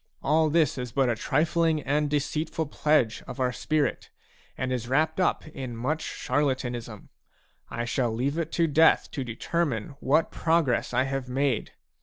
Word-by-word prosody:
All 155 +2 +3
this 155 -4 +2
is 125 -1 -4
but 135 +1 +2
a - - 0
trifling 160 +5 +1
and 145 +2 0
deceitful 155 +2 -1
pledge 150 -8 +1
of - - -7
our 125 -1 +1
spirit, 150 +1 -1 0.5
and 130 0 -2
is 120 -2 -3
wrapped 150 +8 +1 0.3
in 130 -6 -6
much 150 +7 -1
charlatanism. 125 -5 -2 0.6
I 120 - -3
shall 120 0 0
leave 135 +8 -1
it 165 -1 -3
to 170 - +3
Death 160 +1 +4
to 135 - -3
determine 120 0 -2
what 155 +4 +2
progress 160 -6 +1
I 125 +1 +2
have 135 -1 -3
made. 135 -1 0
140 Hz, 155 wpm, -27 LUFS, 125-155 Hz, 0.6 s, Death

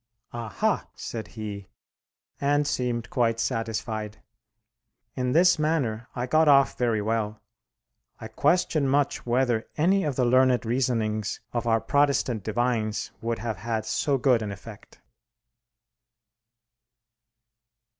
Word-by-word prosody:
"Aha!" 115 -4 -1
said 110 -2 -6
he; 100 -2 -6 0.7
and 145 +1 +2
seemed 125 -5 -2
quite 115 -2 +1
satisfied. 110 -2 -3 0.9
In 125 0 -1
this 175 +1 +5
manner 130 -8 0
I 125 - -2
got 155 +4 +3
off 140 -3 +5
very 115 -4 0
well. 110 -1 -1 0.8
I 110 - -7
question 150 +4 +1
much 140 -1 0
whether 120 -2 +1
any 190 +5 +3
of 145 -4 -1
the 125 - +2
learned 130 0 +3
reasonings 115 -4 -1
of 120 0 -2
our 115 -1 +3
Protestant 140 -5 +1
divines 110 -1 -1
would 115 0 -2
have 110 -3 -4
had 110 +1 -3
so 140 +4 0
good 125 -3 +3
an 105 -2 -4
effect. 105 +2 -12
120 Hz, 115 wpm, -26 LUFS, 110-135 Hz, 0.9 s, this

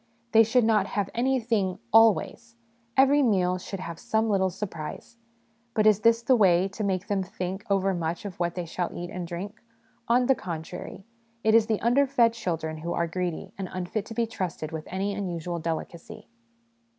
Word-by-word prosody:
They 225 - +7
should 230 +3 +3
not 215 -3 +3
have 200 -2 -2
anything 230 -6 0
' 115 - -38
always 225 +1 +3 0.2
'; 230 +1 -30
every 275 +2 +5
meal 185 -7 +2
should 195 +1 -6
have 170 -2 -7
some 220 0 0
little 190 -2 +2
surprise. 185 +3 -7 0.6
But 215 - +2
is 215 -2 +5
this 230 +1 +3
the 255 - +4
way, 185 -4 +4
to 210 +3 -5
make 190 -1 -1
them 205 -3 0
think 190 0 -5
overmuch 185 -3 0
of 190 -4 -7
what 175 -1 -1
they 180 -2 -3
shall 175 +1 -3
eat 175 0 -6
and 180 -2 -5
drink? 190 +5 -6 0.5
On 245 +2 +3
the 265 - +5
contrary, 170 -2 -7 0.4
it 220 - +3
is 225 -1 +5
the 220 -3 0
underfed 245 -1 +3
children 165 -8 -3
who 170 +2 -4
are 170 - 0
greedy, 175 0 -4
and 190 - -4
unfit 185 +3 -3
to 225 - -8
be 235 0 +1
trusted 180 -7 -4
with 160 -1 -5
any 195 +2 -2
unusual 175 -3 -3
delicacy. 165 +1 -6
195 Hz, 185 wpm, -26 LUFS, 175-225 Hz, 0.6 s, They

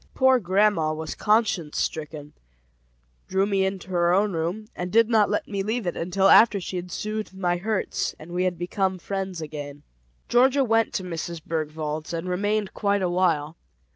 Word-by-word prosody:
Poor 260 -1 +4
grandma 190 -4 +2
was 155 0 -4
conscience 210 -8 +1
stricken, 150 -1 -4 0.9
drew 190 +1 +1
me 195 -1 +1
into 190 -1 -3
her 175 -1 +2
own 200 +2 +2
room, 175 +7 -3
and 180 0 -4
did 230 0 +5
not 215 -3 +4
let - - -1
me 200 -1 -2
leave 220 +2 -2
it 175 - -2
until 185 +3 +1
after 210 0 +6
she 185 - -6
had 180 0 -5
soothed 215 0 -4
my 175 -2 0
hurts 210 +2 -2
and 155 +3 -12
we 180 +1 0
had 180 -2 -1
become 185 +2 -1
friends 190 -2 -4
again. 145 -2 -7 0.4
Georgia 265 +3 +4
went 225 -2 +2
to 190 - -3
Mrs. 170 -1 -5
Bergwald's, 155 0 -3
and 165 +2 -3
remained 205 +3 -1
quite 200 -2 0
a 180 - +1
while. 165 -4 +1
185 Hz, 175 wpm, -25 LUFS, 165-210 Hz, 0.9 s, after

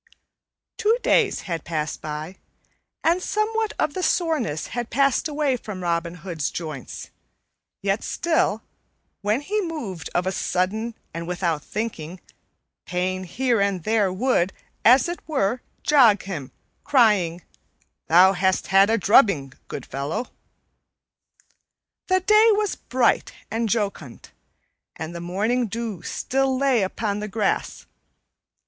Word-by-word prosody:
Two 455 +1 +3
days 440 -4 +3
had 165 -4 -4
passed 155 -2 -3
by, 155 +4 -6 0.7
and 340 +3 +3
somewhat 435 +2 -1
of 295 - 0
the 370 - -3
soreness 310 - 0
had 240 -1 -3
passed 275 +3 +2
away 295 -3 0
from 210 -6 -7
Robin 170 0 -1
Hood's 165 -5 -3
joints, 155 -7 -7 0.7
yet 195 +2 0
still, 320 -10 0 0.6
when 210 +5 +1
he 420 +8 -1
moved 245 - -5
of 175 - +1
a 190 - 0
sudden 215 +5 -1 0.2
and 170 0 -5
without 175 -3 -1
thinking, 185 -6 -5 0.7
pain 185 +1 -2
here 240 +4 0
and 200 -4 0
there 215 -2 +2
would, 195 -2 +1 0.3
as 255 +8 +6
it 345 0 -4
were, 245 -6 0 0.2
jog 240 -9 +5
him, 160 -9 -6 0.3
crying, 205 - +3 0.6
"Thou 185 +3 +6
hast 190 0 +1
had 195 +2 +6
a 225 - +3
drubbing, 195 - +4
good - - -6
fellow." 140 - -4 1.8
The 370 0 +3
day 425 +4 +5
was 415 -1 0
bright 255 -1 +1 0.2
and 225 0 -1
jocund, 200 - -3 0.6
and 160 +2 -6
the 170 - -5
morning 215 +8 0
dew 220 -4 -4
still 265 +5 -1
lay 265 -4 +3
upon 200 +2 -2
the 210 - -4
grass. 210 -1 -1
210 Hz, 130 wpm, -23 LUFS, 180-265 Hz, 1.8 s, as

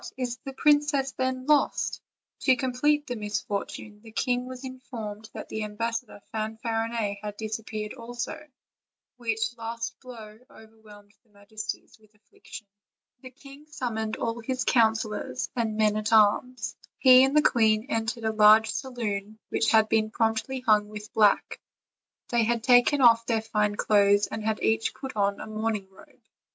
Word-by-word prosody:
is 245 -2 -3
the 270 - -6
princess, 290 -1 +2
then, 260 -1 -2
lost?" 295 0 +1 0.4
To 260 - +4
complete 270 +4 +1
the 245 - -4
misfortune, 210 0 -5
the 225 0 -14
king 250 +2 -1
was 255 0 -9
informed 225 -5 -8
that - - -7
the 220 - -4
ambassador 225 0 -4
Fanfarinet 225 -1 -2
had 210 -1 -6
disappeared 215 -1 -5
also, 240 +4 -6 0.7
which 225 -1 -2
last 230 0 -5
blow 220 -4 -11
over 220 0 -17
whelmed 205 -1 -16
their 225 - -35
majesties 215 +2 -8
with 215 0 -26
affliction. 210 +1 -13 0.5
The 255 - -11
king 275 +3 -15
summoned 220 -7 -3
all 230 0 -3
his 255 +2 -3
counselors 220 0 0
and 225 -3 -1
men 215 -1 +3
at 215 0 -2
arms. 225 +2 +2 0.2
He 255 -1 +7
and 270 +3 +2
the 300 - +5
queen 220 -1 +3
entered 225 -1 -2
a 220 0 0
large 215 +1 +6
saloon 215 -6 -4
which 225 - +1
had 220 -1 +5
been 220 0 +1
promptly 225 +4 -1
hung 210 -4 +3
with 210 0 -9
black; 210 -2 +2 0.7
they 235 -1 +2
had 230 0 0
taken 250 +3 +5
off 230 -2 +5
their 225 -2 0
fine 210 -2 0
clothes, 205 -1 +3
and 220 - -6
had 220 0 -2
each 225 0 +1
put 265 -3 -7
on 200 -1 0
a - - -6
mourning 215 -2 -3
robe. 190 - -19
225 Hz, 155 wpm, -26 LUFS, 215-250 Hz, 0.7 s, He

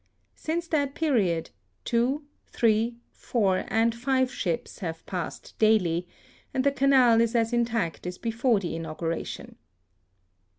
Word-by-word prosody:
Since 335 +2 -3
that 285 -3 0
period 205 - +1 0.3
two, 250 +5 +1 0.2
three, 230 +1 +1
four, 195 -6 0
and 225 +2 +2
five 260 +2 0
ships 170 -5 -3
have 165 -3 -5
passed 180 -2 -5
daily, 180 -6 +3 0.5
and 260 - +2
the 280 - +4
Canal 265 -4 +5
is 230 +1 +1
as 230 0 +2
intact 230 -9 -1
as 180 0 -5
before 230 0 +1
the 175 -4 -4
inauguration. 165 0 -5
230 Hz, 125 wpm, -27 LUFS, 180-255 Hz, 0.5 s, Canal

